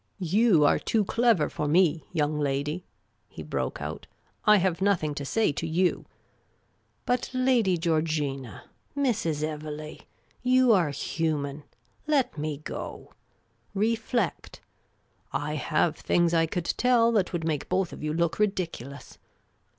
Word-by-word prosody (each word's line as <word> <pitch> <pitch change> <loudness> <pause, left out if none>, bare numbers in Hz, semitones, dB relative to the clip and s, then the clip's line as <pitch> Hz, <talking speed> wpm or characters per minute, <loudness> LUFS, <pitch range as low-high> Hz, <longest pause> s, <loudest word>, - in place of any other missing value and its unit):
" - - -45 0.2
You 210 -9 +5
are - - +4
too 215 -3 0
clever 230 -8 +3
for 150 - -3
me, 165 -1 +3
young 150 0 0
lady," 145 +4 -1 0.5
he - - -9
broke - - -3
out. - - -6 0.2
" - - -37
I 210 -1 +7
have 185 -2 0
nothing 185 -7 +1
to 145 - -5
say 220 +7 +1
to 160 +3 -4
you. 175 +3 +1 1.0
But 250 0 0
Lady 245 -8 +3
Georgina, 155 - -1 0.3
Mrs. 215 - 0
Evelegh 155 0 -6 0.2
— - - -36 0.2
you 255 -3 +6
are 175 -7 +3
human 145 0 -2 0.3
— 125 - -39
let 255 -2 0
me 150 -1 -3
go! - - -7 0.6
Reflect; 225 +3 -1 0.7
I - - -2
have - - 0
things 170 -1 +1
I 165 -1 +3
could 175 +1 -3
tell 240 -2 +4
that 210 -5 +1
would 170 -2 -3
make 155 -3 -2
both 190 -3 0
of - - -9
you 150 0 -2
look 170 +3 0
ridiculous. 165 - -3
165 Hz, 145 wpm, -27 LUFS, 150-210 Hz, 1.0 s, I